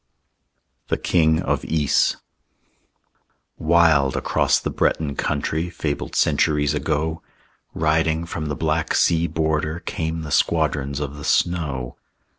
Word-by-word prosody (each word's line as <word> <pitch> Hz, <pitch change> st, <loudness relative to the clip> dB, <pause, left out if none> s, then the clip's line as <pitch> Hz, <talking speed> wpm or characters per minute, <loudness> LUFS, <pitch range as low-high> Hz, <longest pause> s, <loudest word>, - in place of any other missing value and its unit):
THE -, -, 0 dB
KING 80 Hz, -2 st, +2 dB
OF -, -, -1 dB
YS 75 Hz, -3 st, +2 dB, 1.4 s
Wild 80 Hz, -5 st, +3 dB
across -, -, +2 dB
the -, -, -4 dB
Breton 70 Hz, -3 st, 0 dB
country, 80 Hz, +3 st, -2 dB
Fabled 75 Hz, -4 st, -4 dB
centuries 75 Hz, -2 st, +2 dB
ago, 80 Hz, +1 st, -1 dB, 0.5 s
Riding 80 Hz, +1 st, +1 dB
from 80 Hz, -2 st, -5 dB
the 75 Hz, -, -2 dB
black 80 Hz, 0 st, -1 dB
sea 85 Hz, 0 st, +3 dB
border, 80 Hz, 0 st, -1 dB
Came 80 Hz, -1 st, -3 dB
the 75 Hz, -, -7 dB
squadrons 75 Hz, -4 st, +1 dB
of 75 Hz, -1 st, -5 dB
the 75 Hz, -, -9 dB
snow. 70 Hz, -10 st, -1 dB
80 Hz, 115 wpm, -22 LUFS, 75-80 Hz, 1.4 s, Wild